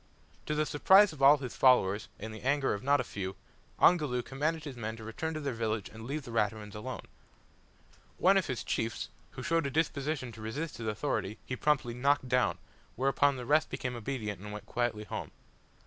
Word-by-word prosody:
To 150 - 0
the 155 0 +1
surprise 190 +7 +6
of 140 - -11
all 140 +2 +8
his 130 -4 -6
followers, 105 -6 +4
and 110 +2 -7
the 110 - -9
anger 135 +1 +1
of 100 - -4
not 140 +2 +3
a - - +1
few, 95 -1 -5 0.4
Ongoloo 150 -8 +4
commanded 155 +5 -2
his 145 -4 -6
men 110 -1 -5
to 110 - -10
return 160 +9 -4
to - - -2
their 140 -3 -2
village 110 -2 -2
and 110 +1 -10
leave 145 +2 -3
the 120 - -9
Raturans 105 -2 -1
alone. 125 +5 -6 1.1
One 190 +2 +5
of 195 -3 +2
his 130 -3 -3
chiefs, 115 0 -2 0.2
who - - -7
showed 165 -3 +1
a - - -1
disposition 145 -3 -1
to 110 -1 -11
resist 145 +9 -4
his 115 - -5
authority, 105 -2 -2
he 125 - -3
promptly 135 -3 +1
knocked 135 +2 +2
down, 125 -4 +2 0.4
whereupon 135 +2 +2
the 125 - -6
rest 150 +4 +3
became 125 -1 -3
obedient 110 -5 -4
and 105 +1 -7
went 105 0 -7
quietly 120 -3 -1
home. 105 - -5
130 Hz, 200 wpm, -31 LUFS, 110-145 Hz, 1.1 s, all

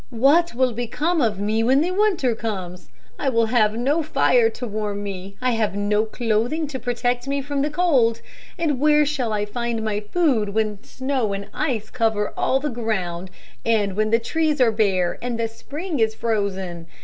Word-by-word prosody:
"What 275 +7 +3
will 255 -1 +2
become 295 +9 -1
of 215 -5 +1
me 215 +2 0
when 260 +5 +4
the 350 +3 0
winter 370 - +2
comes? 185 -5 -5 0.3
I 275 - +1
will 230 -2 +2
have 220 -2 +2
no 280 +7 +1
fire 450 +9 +3
to 250 - -6
warm 210 -2 -3
me. 195 0 -7
I 255 - +3
have 220 -4 0
no 210 +1 +1
clothing 235 +7 0
to 265 -3 -4
protect 245 +1 -1
me 280 0 0
from 285 0 -2
the 295 - +1
cold, 275 -9 +2 0.4
and 300 -6 0
where 300 +1 +4
shall 270 -6 -1
I 210 -1 0
find 230 +1 -3 0.2
food 245 - +1
when 215 -2 -1
snow 260 -6 -2
and 200 +1 -5
ice 235 -8 -2
cover 220 -4 0
all 265 - +1
the 295 +2 -2
ground 190 -7 -3 0.3
and 210 -4 +1
when 215 +1 +1
the 230 - +4
trees 305 +5 0
are 245 -3 +5
bare 195 -5 +1
and 240 -1 -3
the 230 - +1
spring 295 +8 -5
is 220 -1 +2
frozen? 195 -7 -2
230 Hz, 185 wpm, -22 LUFS, 210-275 Hz, 0.4 s, are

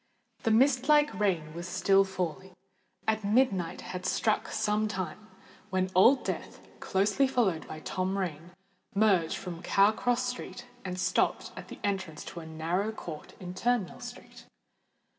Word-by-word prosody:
The - - +1
mist 255 +4 +4
like 295 0 +5
rain 175 -7 0
was 170 +2 -6
still 195 +2 +4
falling, 185 -1 -4 0.5
and 220 -1 +1
midnight 200 -5 +2
had 180 0 -6
struck 215 +3 +1
some 215 0 0
time, 190 +1 -5 0.4
when 185 0 0
Old 240 +9 +6
Death, - - -4 0.2
closely 205 +7 +2
followed 215 -11 +1
by 155 - -8
Tom 185 +3 -2
Rain, 170 -3 -3 0.5
merged 195 -6 +3
from 175 -2 -7
Cow 195 +3 +4
Cross 245 +2 0
Street, 250 -1 -5 0.2
and 185 -1 -4
stopped 185 0 +1
at - - -8
the - - -9
entrance 190 -6 -2
to 170 - -7
a 160 - -9
narrow 170 +6 -1
court 165 -8 -8
in 180 -1 -6
Turnmill 225 -1 0
Street. - - -10
195 Hz, 150 wpm, -30 LUFS, 180-220 Hz, 0.5 s, Old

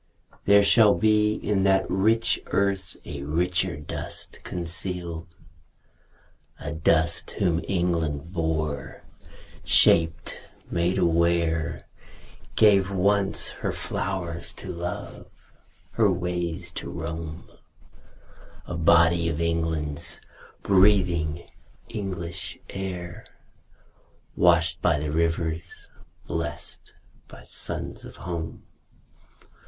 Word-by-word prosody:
There 100 0 +6
shall 105 0 +6
be 105 -1 +3
In 100 -2 0
that 95 0 +3
rich 110 +4 +2
earth 100 -1 0
a 70 -1 -6
richer 90 +4 0
dust 75 - -5
concealed; 85 -1 -4 1.2
A - - -5
dust 80 +1 +2
whom 90 -3 +1
England 85 -3 -1
bore, 80 -4 -2 0.6
shaped, 80 -1 +3 0.3
made 85 +2 +1
aware, 85 -1 +1 0.7
Gave, 100 -3 +5
once, 100 +1 +2
her - - 0
flowers 85 -3 -3
to 95 - -7
love, 85 0 -6 0.6
her 105 -4 +3
ways 90 -2 -3
to - - -6
roam, 80 -1 -6 1.2
A - - -6
body 85 0 +4
of 80 -1 -3
England's, 80 -3 -1 0.4
breathing 90 -5 +3 0.4
English 90 -6 -5
air, 90 -3 -5 1.1
Washed 85 -1 +4
by 85 -4 +3
the 75 0 -3
rivers, 85 +1 -2 0.3
blest - - -5 0.3
by - - -13
suns - - -6
of - - -11
home. 85 -2 -6
85 Hz, 90 wpm, -25 LUFS, 80-95 Hz, 1.2 s, There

